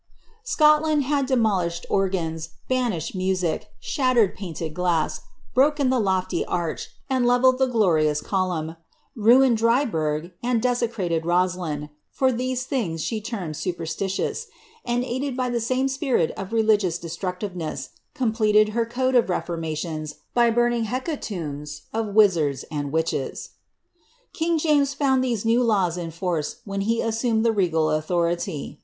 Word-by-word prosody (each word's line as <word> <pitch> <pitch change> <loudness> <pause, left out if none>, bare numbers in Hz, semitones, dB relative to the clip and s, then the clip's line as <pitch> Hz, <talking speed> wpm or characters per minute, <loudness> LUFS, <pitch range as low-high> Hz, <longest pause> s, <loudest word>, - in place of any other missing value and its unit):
Scotland 305 - +4
had 280 0 0
de 260 - +2
molished 185 -7 0
organs, 165 -5 -1 0.2
banished 240 - -1
music, 185 -3 -1
shattered 255 - +2
painted 165 -5 -5
glass, 175 -3 0 0.3
broken 280 0 +3
the 260 - +2
lofty 190 -3 0
arch, 170 -2 -3 0.2
and 260 -2 +1
levelled 255 +1 +4
the 265 - +3
glorious 160 -11 +2
column, 170 -3 -2 0.4
ruined 240 +1 +5
Dryburgh, 180 - +1
and 240 -1 +1
de 250 - +1
aecrated 220 -9 -1
Rosiin, 175 -4 0 0.2
for 260 -1 +1
these 255 +1 -2
things 180 - -2
she 220 -2 -2
termed 195 -8 -5
superstitious; 180 +3 -3 0.4
and, 240 +1 0
aided 260 +1 -3
by 250 -1 0
the 240 - 0
same 255 +4 +1
spirit 270 - 0
of 190 +2 -7
religious 215 -6 +2
desuructiTeness, 175 -4 -5 0.3
completed 215 -5 +3
her 230 +1 -1
code 255 +2 0
of 240 -5 +4
reform 175 -2 -2
ations 155 -1 -4 0.2
by 240 -1 +4
burning 240 0 +2
hecatombs 170 - -4
of 220 -2 -2
wizards 165 - +3
and 145 -2 -3
witches. 160 -3 -2 0.8
King 330 0 0
James 290 -3 +2
found 265 -2 +2
tliese 235 -4 -1
new 230 +2 +3
laws 195 -7 +2
in 175 -2 -4
force 165 -2 -2
when 195 -1 -3
he 230 +3 +1
assumed 225 0 0
the 230 - +4
regal 165 -6 +1
authority. 170 -1 -1
210 Hz, 140 wpm, -24 LUFS, 170-250 Hz, 0.8 s, ruined